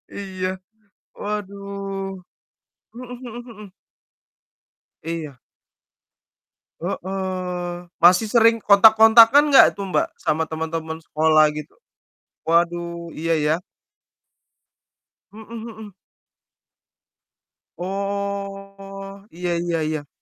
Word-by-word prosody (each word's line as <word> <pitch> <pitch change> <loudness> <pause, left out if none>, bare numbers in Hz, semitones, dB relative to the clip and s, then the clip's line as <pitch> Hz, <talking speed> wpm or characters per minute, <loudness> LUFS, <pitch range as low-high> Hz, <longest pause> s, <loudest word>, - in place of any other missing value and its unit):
Iya 190 -2 -4 0.7
waduh. 200 -2 -5 0.7
Mhm 250 +1 -9
mhm 240 -1 -9
mhm. 215 -2 -12 1.4
Iya. 160 -5 -6 1.4
Heeh. 180 -1 -4
Masih 180 +5 +5
sering 230 0 +5
kontak-kontakan 225 +7 +7
nggak 275 - +9
tuh, 200 - -6
Mbak, - - +1 0.2
sama 160 +1 0
teman-teman 160 0 -5
sekolah 155 -1 +3
gitu? 150 0 -8 0.7
Waduh, 170 0 0
iya 165 +1 0
ya. 150 - +3 1.8
Mhm 220 +2 -13
mhm. 220 -3 -9 1.8
Oh, 195 +1 -6
iya 175 +1 -4
iya 170 -1 -1
iya. 155 -2 -4
195 Hz, 75 wpm, -22 LUFS, 170-205 Hz, 1.8 s, nggak